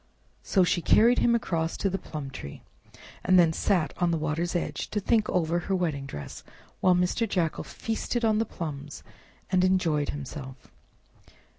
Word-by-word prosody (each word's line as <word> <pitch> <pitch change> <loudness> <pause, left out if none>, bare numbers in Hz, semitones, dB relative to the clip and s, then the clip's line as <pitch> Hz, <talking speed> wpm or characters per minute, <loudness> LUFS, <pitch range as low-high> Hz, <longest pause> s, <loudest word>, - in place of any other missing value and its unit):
So 190 - +2
she 175 0 +1
carried 235 +8 +5
him 235 0 +4
across 165 -7 -1
to - - 0
the 195 0 -2
plum 150 -5 -7
tree, 70 - -9 0.6
and 185 0 +4
then 170 -2 +5
sat 175 -2 +1
on 175 - +1
the 165 - +1
water's 160 +3 -2
edge 175 - -2
to 210 - -1
think 215 +1 +1
over 170 -1 +1
her 190 +3 -1
wedding 155 -7 -2
dress, 75 - -8 0.4
while 185 -1 +4
Mr. 180 +5 +1
Jackal 170 -5 0
feasted 230 +1 -3
on 215 -1 +3
the - - +3
plums 150 -7 -7 0.5
and 185 -1 +3
enjoyed 170 -6 +2
himself. 135 -2 -7
175 Hz, 165 wpm, -27 LUFS, 155-195 Hz, 0.6 s, carried